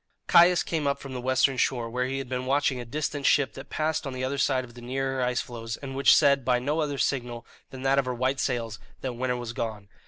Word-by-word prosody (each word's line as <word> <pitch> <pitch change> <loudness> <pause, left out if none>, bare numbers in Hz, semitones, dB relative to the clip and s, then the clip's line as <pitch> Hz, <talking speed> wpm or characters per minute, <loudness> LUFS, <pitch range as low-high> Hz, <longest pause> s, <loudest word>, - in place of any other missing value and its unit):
Caius 175 +1 +6
came 155 -4 -2
up 140 - +1
from 135 -1 -9
the 125 - -4
western 130 +1 +2
shore, 120 -2 0
where 125 +2 -1
he 135 +1 -3
had 135 -1 -4
been 130 0 -3
watching 135 -1 +1
a 120 - -6
distant 145 +3 -3
ship 140 -2 +3
that 135 - -10
passed 155 -1 -1
on 135 - -5
the 130 0 -4
other 135 +2 -2
side 130 -2 +2
of 120 -1 -12
the 120 - -12
nearer 135 +2 -2
ice 125 0 0
floes, 115 -2 -6
and 135 -1 -7
which 140 - +6
said, 140 -1 +4
by 125 0 +2
no 145 +6 -1
other 145 -2 -2
signal 120 -4 -2 0.2
than 130 -1 -9
that 135 +1 +3
of 135 - 0
her 125 -1 -2
white 130 +2 0
sails, 115 -4 -2 0.2
that 130 - -2
winter 125 +1 -1
was 120 -1 -5
gone. 110 -3 -5
130 Hz, 255 wpm, -27 LUFS, 125-140 Hz, 0.2 s, Caius